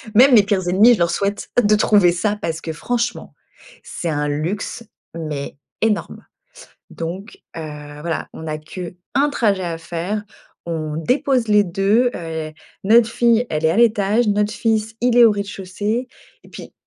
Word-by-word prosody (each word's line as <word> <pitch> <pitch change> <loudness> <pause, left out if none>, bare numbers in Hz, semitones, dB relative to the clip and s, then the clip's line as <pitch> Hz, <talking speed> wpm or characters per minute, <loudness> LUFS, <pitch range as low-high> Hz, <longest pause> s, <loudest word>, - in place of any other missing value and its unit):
Même 260 +4 +7
mes 210 - +7
pires 195 -3 -1
ennemis, 215 +7 +6
je - - -9
leur 170 0 +2
souhaite 200 +3 -2
de 210 +1 +4
trouver 205 -4 +4
ça 205 +4 -1
parce 165 -4 -3
que 160 - -5
franchement, 240 +7 -3 0.5
c'est 170 - -5
un 150 -1 -1
luxe, 175 +10 -3 0.3
mais 150 -5 -5 0.3
énorme! 215 -2 -1 0.7
Donc, 175 +5 -7 0.2
heu, - - -4 0.4
voilà, 165 -1 -3
on 160 - -8
a 155 -1 -3
qu' 175 +3 -8 0.2
1 290 +1 +3
trajet 205 -8 0
à 165 -1 -4
faire. 175 +6 -4 0.4
On 155 -2 -3
dépose 250 - 0
les 210 -1 +5
2. 200 +7 +2
Heu, 160 -2 -5 0.3
notre 225 +2 +5
fille, 235 0 +3
elle 155 0 -2
est - - +3
à - - 0
l'étage, 220 0 +3
notre 205 0 +1
fils, 220 -1 -1
il 245 0 +2
est 240 - +9
au 225 - +6
rez-de-chaussée 205 +4 -3 0.4
et - - -16
puis, - - -11
200 Hz, 165 wpm, -20 LUFS, 165-225 Hz, 0.7 s, est